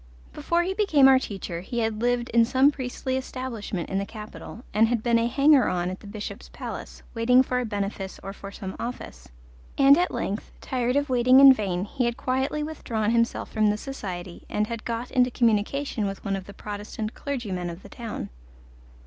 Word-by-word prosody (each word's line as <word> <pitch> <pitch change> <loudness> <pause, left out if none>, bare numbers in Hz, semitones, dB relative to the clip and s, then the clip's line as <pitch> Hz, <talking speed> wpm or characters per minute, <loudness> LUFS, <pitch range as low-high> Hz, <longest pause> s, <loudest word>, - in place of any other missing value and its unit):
Before 340 +4 0
he 375 +2 -1
became 325 -10 +5
our 265 -1 +7
teacher 190 -7 -5
he 240 +6 -6
had 225 -2 -1
lived 245 0 +1
in 235 0 +5
some 260 +4 +4
priestly 260 -1 -3
establishment 250 -8 -4
in 195 - -1
the 200 - -2
capital, 215 +2 -9
and 220 +2 +5
had 235 -1 -1
been 235 -1 +3
a 230 - +1
hanger 280 +2 +5
on 180 0 -1
at 185 - -7
the 205 - -13
Bishop's 205 0 -7
palace, - - -7
waiting 250 +3 +4
for 250 -1 -1
a 250 - -1
benefice 200 -2 -4
or 195 0 -6
for 200 0 -9
some 190 -1 -7
office, 65 - -6 0.5
and 280 +3 +7
at 360 - +2
length, 205 +2 -4
tired 250 -1 -1
of 285 0 +1
waiting 255 +1 +6
in 275 -1 +10
vain, 190 -5 -2
he 250 +4 -1
had 235 +1 -1
quietly 265 +4 -1
withdrawn 230 -8 -2
himself 230 0 0
from 215 -1 +2
this 210 +1 0
society 185 -10 -6
and 210 - 0
had 230 0 -6
got 235 +1 -3
into 250 -1 +3
communication 230 0 0
with 195 0 -6
one 195 -1 0
of 190 -1 -6
the 200 - -10
Protestant 210 +2 -5
clergymen 205 -11 -4
of 170 +2 -9
the - - -12
town. 225 - -6
230 Hz, 200 wpm, -26 LUFS, 205-260 Hz, 0.5 s, in